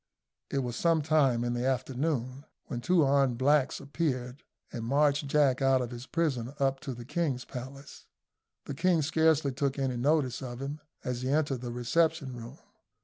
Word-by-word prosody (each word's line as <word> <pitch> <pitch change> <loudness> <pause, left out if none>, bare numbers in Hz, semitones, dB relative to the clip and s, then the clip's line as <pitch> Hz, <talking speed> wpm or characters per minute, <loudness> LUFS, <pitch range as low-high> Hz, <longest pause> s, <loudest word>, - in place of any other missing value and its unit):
It 135 -1 -1
was 120 -1 -4
sometime 155 -7 +2
in 120 0 -1
the 120 0 -2
afternoon 130 +1 -2 0.2
when 120 - -5
two 175 +5 +3
armed 135 -3 +3
blacks 140 +1 +2
appeared, 135 -3 -3 0.3
and 115 - -4
marched 145 +3 +2
Jack 140 -2 +3
out 135 -1 +4
of 125 -1 -3
his 120 +2 -8
prison 140 -6 -1
up 135 -1 +1
to 135 -2 -6
the 120 0 -9
king's 145 -3 -1
palace. 135 +3 -9 0.6
The 145 - -5
king 170 +2 +2
scarcely 155 -1 +2
took 140 +1 -1
any 130 -2 -1
notice 130 -1 +1
of 120 -2 -6
him 140 +3 -5 0.2
as 125 -1 -3
he 130 - -2
entered 145 -3 +1
the 120 -1 -5
reception 140 +3 0
room. 115 -1 -9
135 Hz, 170 wpm, -29 LUFS, 125-150 Hz, 0.6 s, out